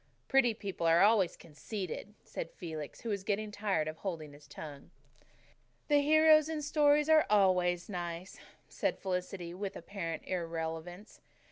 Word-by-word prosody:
"Pretty 255 -4 +4
people 195 -5 -3
are 165 +1 +5
always 205 -4 +4
conceited," 185 +5 -6
said - - -6
Felix, 160 -5 -7
who 230 - -5
was 200 -2 -2
getting 210 0 -1
tired 200 -7 0
of 155 0 -5
holding 160 -6 -5
his 145 +1 -16
tongue. 145 -3 -9 1.0
"The 290 -1 +5
heroes 310 +1 +6
in 310 -2 -3
stories 295 0 +3
are 315 -1 +5
always 180 -4 +3
nice," 175 -1 -5 0.3
said - - -1
Felicity, 180 -2 -4
with 195 +1 -5
apparent 170 -5 -5
irrelevance. 170 +2 -5
190 Hz, 140 wpm, -32 LUFS, 170-220 Hz, 1.0 s, heroes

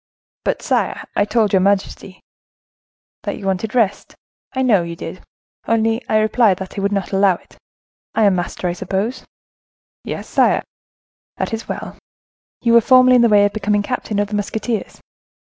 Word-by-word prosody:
"But, - - -1
sire, - - 0
I 205 - +2
told 215 -1 +1
your 190 - +5
majesty—" 195 0 -1 1.0
"That - - -4
you 195 - -9
wanted 195 +4 -2
rest, 210 -5 0 0.4
I 260 0 -1
know 220 -8 +4
you 170 0 -5
did: 165 +2 -8 0.5
only 225 +1 +1
I 215 - +3
replied 215 -2 +3
that 190 -1 -8
I 200 - -3
would 200 +1 0
not 195 -3 -2
allow 195 -1 +3
it—I 220 - -8
am 200 -2 +5
master, 180 0 -3
I 175 - -1
suppose?" 200 +8 -3 0.8
"Yes, - - -6
sire." - - +2 0.7
"That - - -3
is 225 - -4
well. - - -6 0.7
You 235 -1 +3
were 235 - +7
formerly 255 +1 +6
in - - +5
the 235 - +4
way 205 -1 +5
of 205 - -1
becoming 205 -1 0
captain 220 -2 -3
of 205 0 0
the 210 - -3
musketeers?" 215 +2 -3
205 Hz, 170 wpm, -19 LUFS, 195-225 Hz, 1.0 s, were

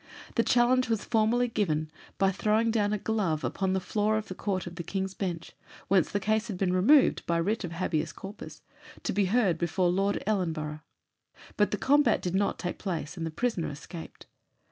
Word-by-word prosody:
The 230 - +3
challenge 250 +1 +3
was 225 -3 0
formally 235 +2 +2
given 155 -9 -1 0.3
by 195 0 +3
throwing 215 +4 +1
down 210 -2 +1
a 210 - +1
glove 195 -8 -1
upon 190 -1 -1
the 190 - +1
floor 210 +3 0
of 220 - -5
the - - -4
Court 190 -1 -2
of 175 - -7
King's 190 -1 -2
Bench, 175 -4 -4 0.4
whence 190 -4 +3
the 205 - 0
case 215 +2 0
had 205 -5 -4
been 180 -1 +1
removed 245 +11 +5
by 170 - +2
"Writ 210 +6 0
of 175 -2 -5
Habeas 160 -2 -1
Corpus," 195 +6 -10 0.4
to - - -1
be 200 +1 +2
heard 190 -5 +2
before 175 +1 +1
Lord 195 +2 0
Ellenborough. 160 -7 -1 0.7
But 210 - +3
the 210 - -1
combat 290 +6 +3
did 180 - -3
not 200 +1 +1
take 175 - -4
place, 170 -4 -4
and 165 -2 -3
the - - -3
prisoner 205 +1 -1
escaped. 160 +3 -9
195 Hz, 190 wpm, -28 LUFS, 175-215 Hz, 0.7 s, removed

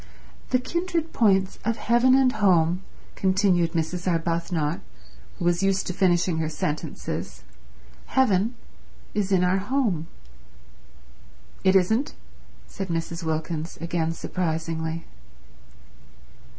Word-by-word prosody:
"The 255 - +4
kindred 335 +4 -2
points 195 -4 +2
of 230 +2 0
heaven 240 +3 +4
and 265 -1 +4
home," 180 -5 +3 0.3
continued 185 -3 +2
Mrs. 170 +2 -2
Arbuthnot, 165 -1 -1 0.6
who - - -3
was 175 +1 +2
used 195 0 +1
to 180 - -3
finishing 175 -2 +2
her 160 -1 -1
sentences. 150 -1 -4 0.6
"Heaven 230 -3 +2 0.6
is 200 -2 -1
in 185 -2 +4
our 180 +2 +2
home." 200 - 0 1.6
"It 190 0 +4
isn't," 220 +9 +2 0.5
said 190 - -6
Mrs. 165 0 -3
Wilkins, 160 0 -3
again 165 -1 -1
surprisingly. 165 -1 -3
180 Hz, 105 wpm, -25 LUFS, 165-205 Hz, 1.6 s, The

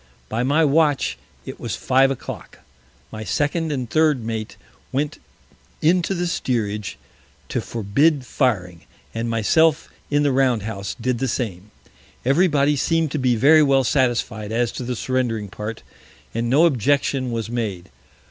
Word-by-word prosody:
By 115 - -1
my 145 +6 +3
Watch 150 -1 +2 0.3
it - - -8
was - - -3
Five 135 +1 +3
o' 135 - -1
Clock. - - -9 0.5
My 110 0 -6
Second 150 - -1
and 130 -4 -2
Third 155 -2 +2
Mate 110 -1 -4 0.3
went 145 +2 -2 0.6
in 175 +4 +3
to 190 +3 -2
the 175 0 -1
Steerage 105 - -2 0.5
to - - -1
forbid 130 +7 +1
firing, 90 - -1 0.3
and 115 +1 -3
myself 155 +8 +2 0.2
in 145 0 +2
the 145 - +2
Round 130 -5 +2
House, 100 -3 -5
did 125 0 -1
the 135 - 0
same. 105 -6 -3 0.6
Every 150 +9 +4
Body 145 -2 +2
seem'd 165 +1 +1
to 150 - -2
be 125 -2 +2
very 150 +7 +6
well 135 -2 +4
satisfied 120 -5 0
as 120 +1 0
to - - -6
the 125 +1 -3
surrendering 120 -4 -1
Part, 105 +3 -6 0.5
and 115 +1 -1
no 145 +7 +5
Objection 135 -2 +1
was 115 -1 -3
made. 105 -7 -4
130 Hz, 155 wpm, -22 LUFS, 115-145 Hz, 0.6 s, very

